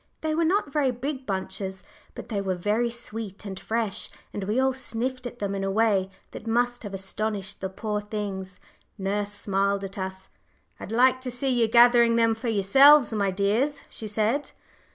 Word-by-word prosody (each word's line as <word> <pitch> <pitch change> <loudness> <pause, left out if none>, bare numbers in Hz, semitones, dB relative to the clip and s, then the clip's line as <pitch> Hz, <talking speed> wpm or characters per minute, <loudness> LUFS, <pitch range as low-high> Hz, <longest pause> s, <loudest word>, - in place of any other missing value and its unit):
They 315 0 -1
were 330 +2 +2
not 330 -4 +1
very 290 -3 +2
big 260 +2 -4
bunches, 190 -1 -4 0.3
but - - -8
they 205 -4 -1
were 190 -1 -1
very 210 +6 0
sweet 225 -4 -7
and 190 -2 -6
fresh, 220 -2 -2 0.2
and 200 - -4
we 215 +5 0
all 265 0 +3
sniffed 255 0 -3
at 245 - -10
them 200 -3 -2
in 195 0 -2
a 195 - 0
way 200 -2 +2 0.2
that 225 - -9
must 245 +1 +1
have 205 -3 -6
astonished 200 +1 -4
the 190 - -2
poor 210 +2 -3
things. 200 -3 -5 0.4
Nurse 200 +1 -2
smiled 200 -1 0
at 195 +1 -6
us. 190 0 -6 0.5
"I'd - - -8
like 255 +2 +4
to 255 - -4
see 250 +2 -2
you 240 -3 +3
gathering 235 0 +6
them 230 -1 +4
for 225 +2 -5
yourselves, 240 +6 +6
my 200 -2 +1
dears," 210 +10 0
she 220 - -7
said. 220 +7 0
220 Hz, 185 wpm, -26 LUFS, 195-245 Hz, 0.5 s, gathering